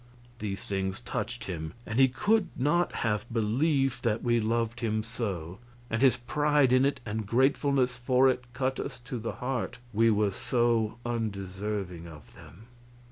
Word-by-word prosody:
These 100 -1 -4
things 95 0 -2
touched 120 -1 -4
him, 80 -3 -5
and 110 +3 -2
he 135 - +8
could 205 - +2
not 150 +7 +2
have 105 +1 -1
believed 135 +5 +1
that 115 -1 0
we 120 -1 +3
loved 115 +1 0
him 110 -2 0
so; 100 -7 -4 0.3
and 115 - 0
his 130 -2 +5
pride 145 +2 +2
in 130 +1 +5
it 140 - 0
and 110 -1 -3
gratefulness 130 +1 +2
for 125 +2 +4
it 125 -1 -1
cut 130 0 -1
us - - -4
to 125 0 -5
the 115 - -4
heart, 125 -1 -3 0.2
we 115 +2 +4
were 105 -2 +2
so 115 +1 +1
undeserving 100 -5 -3
of 75 -5 -13
them. 105 +6 -14
115 Hz, 160 wpm, -29 LUFS, 105-130 Hz, 0.3 s, he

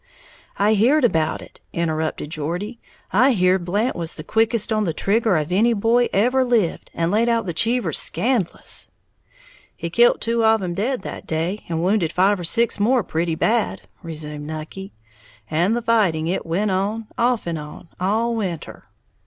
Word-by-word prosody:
"I 210 +2 +3
heared 255 +8 +3
about 160 -9 +1
it," - - -16
interrupted 160 -2 -2
Geordie, 175 +10 -3 0.3
"I 255 +7 +5
heared 185 -2 +2
Blant 210 +8 0
was 165 -2 -4
the 155 - -8
quickest 225 +1 +1
on 215 -1 +1
the 165 -4 -2
trigger 215 0 +2
of 155 +2 -2
any 225 +6 +3
boy 230 +3 +2
ever 250 +6 +3
lived, 230 -9 0
and 170 +1 0
laid 225 +3 +2
out 230 -2 +1
the 175 - -3
Cheevers 225 - +1
scandlous." 215 0 -1 0.9
"He - - -5
kilt 485 +1 +4
two 230 0 0
of 220 -2 +3
'em 175 -1 -2
dead 220 +4 -2
that - - -7
day, 165 +6 -2
and 165 0 -1
wounded 185 -3 +1
five 195 +3 +2
or - - -5
six 230 +5 +2
more 235 +3 +3
pretty 165 -1 -1
bad," 225 +7 0 0.2
resumed 150 -2 -6
Nucky, 160 +5 -7 0.6
"and 175 +9 +2
the 240 - -4
fighting 200 -9 +2
it 175 0 -2
went 195 +5 0
on, 205 +4 -1
off 240 -1 +1
and 165 -2 -3
on, 150 +3 -10
all 220 +6 0
winter. 185 -8 -5
200 Hz, 170 wpm, -21 LUFS, 170-230 Hz, 0.9 s, I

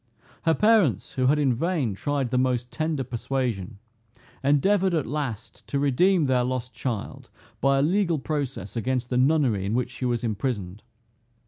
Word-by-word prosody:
Her 165 -1 +4
parents, 210 - +3
who 130 -1 +1
had 145 +3 +4
in 140 -4 +2
vain 145 - -1
tried 140 +4 -2
the 125 - +2
most 125 -1 0
tender 155 -3 -1
persuasion, 120 -6 -3 0.7
endeavored 180 +7 +3
at 155 - 0
last 130 -5 -5
to 140 - -1
redeem 150 +6 +3
their 130 -2 +2
lost 125 0 -3
child, 115 -6 -5 0.3
by 135 0 +3
a - - +3
legal 175 0 +2
process 135 -9 -4
against 125 +1 -2
the 125 - +1
nunnery 130 -7 +2
in 100 +3 -1
which 125 0 -1
she 130 - -5
was 120 -1 -1
imprisoned. 105 -4 -3
130 Hz, 160 wpm, -25 LUFS, 120-150 Hz, 0.7 s, Her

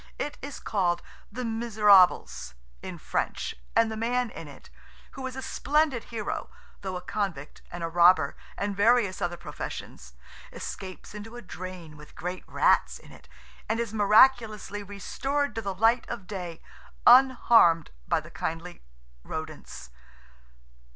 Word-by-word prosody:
It 290 - -3
is 280 0 -7
called 180 -5 0 0.3
"The 250 +3 -4
Miserables," 205 - +3 0.3
in - - -7
French - - -2 0.2
and 225 -1 +4
the - - -4
man 240 +1 0
in 160 - -9
it, 140 - -14 0.4
who 265 -1 -6
is 260 - -7
a 265 - -6
splendid 295 -5 +1
hero, 225 -3 -4 0.3
though 190 -2 -4
a 180 - -5
convict 185 -9 -4
and 175 -1 -6
a - - 0
robber 170 -3 +5 0.2
and 200 0 -2
various 205 -2 +3
other 175 -1 -2
professions, 65 - -8 0.4
escapes 185 0 -8
into 210 +3 -9
a 240 - -8
drain 180 -4 -8
with 150 0 -15
great 180 +1 -5
rats - - +2
in - - -17
it, - - -17 0.4
and 225 +1 0
is 230 -2 -3
miraculously 215 -1 +4
restored 270 +8 -2
to 225 - -3
the 195 -3 -4
light 225 +5 +2
of 205 -6 -5
day, 180 -4 -7 0.4
unharmed 240 - +6 0.2
by - - +2
the - - -12
kindly 165 +2 -5 0.4
rodents. 155 - -7
205 Hz, 145 wpm, -27 LUFS, 175-235 Hz, 0.4 s, unharmed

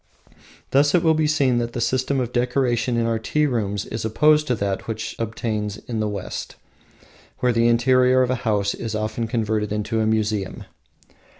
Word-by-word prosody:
Thus 145 +3 +4
it 175 - +3
will 160 -1 +4
be 155 -1 +1
seen 140 -5 +2
that 120 0 -3
the - - -3
system 130 +3 0
of 125 -1 -3
decoration 125 -1 +1
in 115 - +1
our 115 -1 0
tea 150 +7 0
rooms 105 -7 -1
is 110 - -5
opposed 150 +7 +3
to 125 - +1
that 100 -2 -3
which 110 -1 -4
obtains 110 -2 -3
in 115 -1 -5
the 110 -1 0
West, 100 -3 -6 0.8
where 125 -2 +1
the 115 0 +3
interior 125 +2 +4
of 125 - 0
a - - +1
house 100 -3 0
is 110 -2 -5
often 110 +2 -2
converted 110 -3 -1
into 105 +2 -1
a 110 - +1
museum. 110 -3 -1
115 Hz, 185 wpm, -22 LUFS, 110-130 Hz, 0.8 s, Thus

